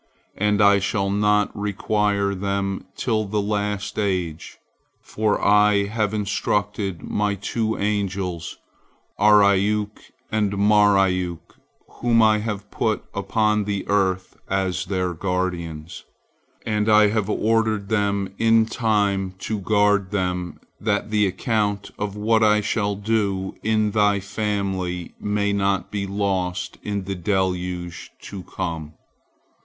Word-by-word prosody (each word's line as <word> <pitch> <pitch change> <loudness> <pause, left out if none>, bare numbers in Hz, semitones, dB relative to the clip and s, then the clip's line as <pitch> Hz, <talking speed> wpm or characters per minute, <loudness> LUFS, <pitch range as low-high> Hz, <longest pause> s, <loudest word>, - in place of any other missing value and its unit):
And 105 0 +2
I 100 0 +6
shall 100 0 -1
not 105 0 +2
require 100 0 0
them 100 0 -2
till 110 -3 0
the 105 +1 -1
last 105 0 -2
age, 90 -6 -2 0.4
for 105 -1 -1
I 105 0 +4
have 105 0 -1
instructed 100 -3 -1
My 105 -1 -1
two 110 +3 -2
angels, 100 -4 -2 0.6
Ariuk 105 0 +3 0.3
and 105 -2 +1
Mariuk, 100 -4 +2 0.3
whom 120 -1 +1
I 110 -1 +4
have 105 -2 -5
put 110 -1 -1
upon 105 +1 +1
the 100 -2 -3
earth 95 -2 0
as 95 -2 -1
their 90 -2 -1
guardians, 85 -3 -3 0.6
and 105 0 0
I 105 -1 +6
have 105 -1 -1
ordered 110 -2 +1
them 100 -3 0
in 115 0 +4
time 100 -5 0
to 110 -2 -2
guard 105 -1 +2
them, 90 -3 -2 0.2
that 105 0 -1
the 105 -1 +3
account 100 +1 -1
of 105 -1 -3
what 110 +2 +2
I 105 0 +5
shall 105 -1 -1
do 100 -2 -1
in 110 -1 +1
thy 105 -1 +3
family 95 -3 -3
may 105 0 0
not 100 -1 0
be 100 -1 -2
lost 95 -2 -2
in 100 -2 -3
the 95 +1 -4
deluge 90 -2 -2
to 100 -2 -8
come. 80 -5 -5
100 Hz, 120 wpm, -23 LUFS, 95-105 Hz, 0.6 s, I